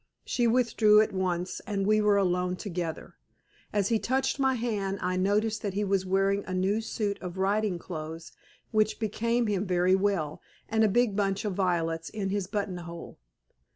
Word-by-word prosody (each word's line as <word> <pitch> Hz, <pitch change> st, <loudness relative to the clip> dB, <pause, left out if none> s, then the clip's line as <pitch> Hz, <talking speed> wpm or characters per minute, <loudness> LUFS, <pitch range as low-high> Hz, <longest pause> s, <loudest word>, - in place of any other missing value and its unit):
She 240 Hz, -2 st, +1 dB
withdrew 225 Hz, -3 st, +4 dB
at 215 Hz, -, -1 dB
once, 180 Hz, -1 st, -2 dB
and 200 Hz, -2 st, -1 dB
we 215 Hz, +1 st, +3 dB
were 210 Hz, -1 st, +4 dB
alone 180 Hz, -1 st, +1 dB
together. 175 Hz, -4 st, -5 dB, 0.6 s
As 200 Hz, -2 st, +1 dB
he 225 Hz, -2 st, +2 dB
touched 265 Hz, +4 st, 0 dB
my 265 Hz, -1 st, +3 dB
hand 210 Hz, -5 st, -2 dB
I 185 Hz, 0 st, -1 dB
noticed 210 Hz, +4 st, +1 dB
that 200 Hz, -3 st, -3 dB
he 205 Hz, -, 0 dB
was 195 Hz, -2 st, 0 dB
wearing 195 Hz, +1 st, +2 dB
a 185 Hz, -, -3 dB
new 195 Hz, +4 st, +1 dB
suit 210 Hz, -2 st, -3 dB
of 180 Hz, 0 st, -6 dB
riding 200 Hz, 0 st, +1 dB
clothes, 165 Hz, -1 st, -7 dB, 0.4 s
which 215 Hz, -1 st, +2 dB
became 230 Hz, +2 st, 0 dB
him 205 Hz, -3 st, 0 dB
very 180 Hz, 0 st, +3 dB
well, 190 Hz, -6 st, 0 dB, 0.3 s
and 220 Hz, 0 st, +2 dB
a -, -, +5 dB
big 235 Hz, 0 st, +2 dB
bunch 200 Hz, 0 st, 0 dB
of 205 Hz, -, -1 dB
violets 165 Hz, -3 st, 0 dB
in 200 Hz, -3 st, -3 dB
his 200 Hz, -2 st, -1 dB
buttonhole. 180 Hz, -4 st, -5 dB
200 Hz, 175 wpm, -28 LUFS, 185-215 Hz, 0.6 s, a